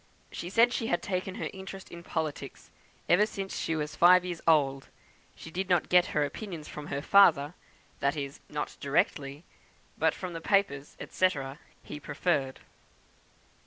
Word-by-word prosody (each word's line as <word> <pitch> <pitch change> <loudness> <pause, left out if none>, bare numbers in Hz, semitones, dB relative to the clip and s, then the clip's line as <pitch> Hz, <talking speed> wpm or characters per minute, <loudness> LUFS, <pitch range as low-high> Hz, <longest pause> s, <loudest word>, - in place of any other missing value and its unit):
She 175 - -6
said 235 +5 +4
she 225 - -2
had 175 - 0
taken 185 0 -3
interest 190 0 -7
in 170 - -9
politics 160 -3 -5 0.4
ever 205 +5 +4
since 195 -2 -5
she 165 - -1
was 150 -1 -3
five 180 +1 +6
years 175 -2 -5
old. 135 -4 +3 0.5
She 160 - -11
did 190 +2 -3
not 175 -3 +2
get 180 0 +5
her 150 -1 +1
opinions 170 -1 -7
from 150 0 -8
her 140 0 -3
father 165 -6 +5 0.5
that 140 +2 0
is, 140 -1 -5
not 150 0 -4
directly 140 -1 -1 0.6
but - - +2
from 180 -2 -6
the 165 - -6
papers, 160 -7 0
&c., 185 - +3 0.5
he 150 - -8
preferred." 140 -3 -1
170 Hz, 155 wpm, -29 LUFS, 145-185 Hz, 0.6 s, five